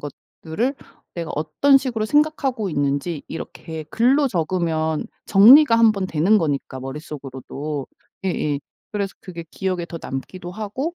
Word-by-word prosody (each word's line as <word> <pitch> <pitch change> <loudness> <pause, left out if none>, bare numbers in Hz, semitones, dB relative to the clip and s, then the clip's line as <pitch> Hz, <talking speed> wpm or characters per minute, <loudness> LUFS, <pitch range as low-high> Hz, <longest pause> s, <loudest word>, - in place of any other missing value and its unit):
것들을 160 - -4 0.4
내가 170 -2 -4
어떤 155 - +3
식으로 245 -5 -1
생각하고 270 - +1
있는지 145 +2 -1
이렇게 160 0 -7
글로 270 +5 +3
적으면 160 -4 -1 0.2
정리가 230 +6 +8
1 225 -1 +6
번 195 -3 -2
되는 185 +6 +3
거니까 140 -5 -2
머릿속으로도 140 0 -6 0.4
예예 150 -6 -1 0.3
그래서 200 -2 -2
그게 170 -3 -8
기억에 185 -3 -2
더 170 -1 -7
남기도 175 +7 -6
하고 220 - -4
175 Hz, 305 characters per minute, -22 LUFS, 150-225 Hz, 0.4 s, 정리가